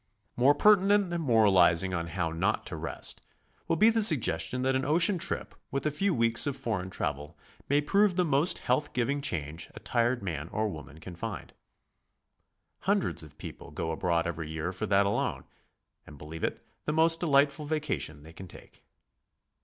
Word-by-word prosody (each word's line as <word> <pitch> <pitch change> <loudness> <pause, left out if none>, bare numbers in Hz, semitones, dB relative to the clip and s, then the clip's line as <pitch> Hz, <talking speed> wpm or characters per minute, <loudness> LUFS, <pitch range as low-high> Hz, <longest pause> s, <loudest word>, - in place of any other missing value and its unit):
More 135 +4 +4
pertinent 200 +1 +4
than 170 -1 -2
moralizing 95 - +4
on 85 -2 -2
how 85 -1 -2
not 95 +6 -1
to - - -6
rest, 80 +1 -4 0.5
will - - +1
be 215 +7 +5
the 225 0 +1
suggestion 125 - +1
that 130 0 +1
an 130 - 0
ocean 170 +6 +3
trip 170 - -3 0.2
with 140 - -3
'a 155 - +1
few 195 +7 0
weeks 115 -2 +2
of 140 -1 -2
foreign 95 -5 -3
travel 75 -4 -4 0.3
may 145 +1 +3
prove 195 +5 +2
the 180 -1 +2
most 145 +3 +2
health 130 +4 -1
giving 140 +4 -1
change 80 - -3
a - - -8
tired 120 0 0
man 80 -4 -4
or 110 0 -1
woman 75 -3 -10
can 90 +2 -9
find. 110 +4 -6 1.3
Hundreds - - +1
of - - -12
people - - -9
go 80 +3 -4
abroad 85 +1 0
every 80 -2 -4
year 80 +3 -4
for 110 +4 -4
that 100 0 +3
alone, 100 - -1 0.6
and 75 - -12
believe 75 +3 -9
it - - -3 0.2
the 150 - -1
most 165 +1 +4
delightful 145 -1 +2
vacation 145 - -3
they 80 +1 -13
can 95 +2 -10
take. - - -15
115 Hz, 175 wpm, -29 LUFS, -, 1.3 s, be